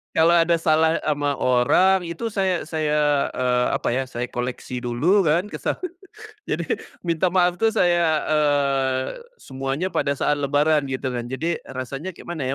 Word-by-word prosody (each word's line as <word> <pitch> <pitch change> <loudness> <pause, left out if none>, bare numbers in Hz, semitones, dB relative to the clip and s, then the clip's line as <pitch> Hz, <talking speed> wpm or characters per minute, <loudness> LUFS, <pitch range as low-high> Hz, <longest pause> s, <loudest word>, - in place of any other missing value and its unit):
Kalau 165 +1 +5
ada 170 0 +4
salah 160 0 +2
ama 145 -2 0
orang 175 +9 +3
itu 220 +7 -4
saya 190 -3 0
saya, 150 -2 +1
eee, 125 -1 +1
apa - - -1
ya, 135 +2 0
saya 120 0 -5
koleksi 125 0 -4
dulu 150 +12 +2
kan 175 +7 +1
kesalahan, 365 -2 -3 0.6
jadi - - -2 0.4
minta 170 +1 +1
maaf 180 -1 +2
tuh 225 0 +2
saya, 170 -6 +2
eee, 140 -3 +1 0.3
semuanya 135 +7 -3
pada 140 0 0
saat 145 +2 0
lebaran 145 +1 +2
gitu 130 0 -3
kan. 120 -1 -4
Jadi 160 +7 -2
rasanya 135 +8 -6
kayak - - -14
mana 160 -5 -3
150 Hz, 155 wpm, -23 LUFS, 135-170 Hz, 0.6 s, Kalau